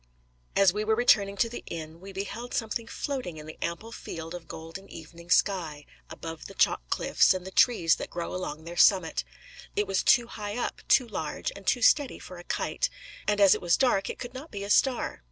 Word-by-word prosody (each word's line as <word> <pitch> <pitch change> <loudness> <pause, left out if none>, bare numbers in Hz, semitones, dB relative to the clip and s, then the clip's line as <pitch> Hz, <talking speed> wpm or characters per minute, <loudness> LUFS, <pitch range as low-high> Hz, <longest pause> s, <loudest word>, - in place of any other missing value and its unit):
As 195 -3 +5
we 210 +1 -1
were 220 +1 +2
returning 200 -4 +3
to 230 - +3
the 240 - -7
inn, 160 0 -7
we 195 +2 -10
beheld 200 +5 -5
something 225 0 -2
floating 255 - -4
in 150 - -9
the 155 - -10
ample 170 +7 -4
field 165 -6 -7
of 175 -2 -8
golden 165 +5 -9
evening 170 +2 -12
sky, 165 -7 +1 0.2
above 165 -1 -8
the - - -12
chalk - - +3
cliffs - - +3
and 185 -1 -5
the 190 - -7
trees 185 -7 +4
that - - -6
grow 170 -1 -4
along 160 -4 -5
their 170 +1 -8
summit. 180 -3 +4 0.5
It 205 - +1
was 195 -1 0
too 240 -2 +5
high 210 -1 -6
up, 245 - -3
too 255 -2 +5
large, 160 -8 -3
and 200 -1 -12
too 245 - +2
steady 285 +3 +4
for 180 -1 -10
a - - -10
kite; - - -1 0.4
and 210 0 +2
as 200 -2 +7
it - - -2
was 175 -1 +3
dark, 245 -7 +2
it - - -5
could 245 -1 -7
not 275 +5 -8
be 200 -5 -6
a 200 - -3
star. 255 0 +2
195 Hz, 215 wpm, -28 LUFS, 170-230 Hz, 0.5 s, as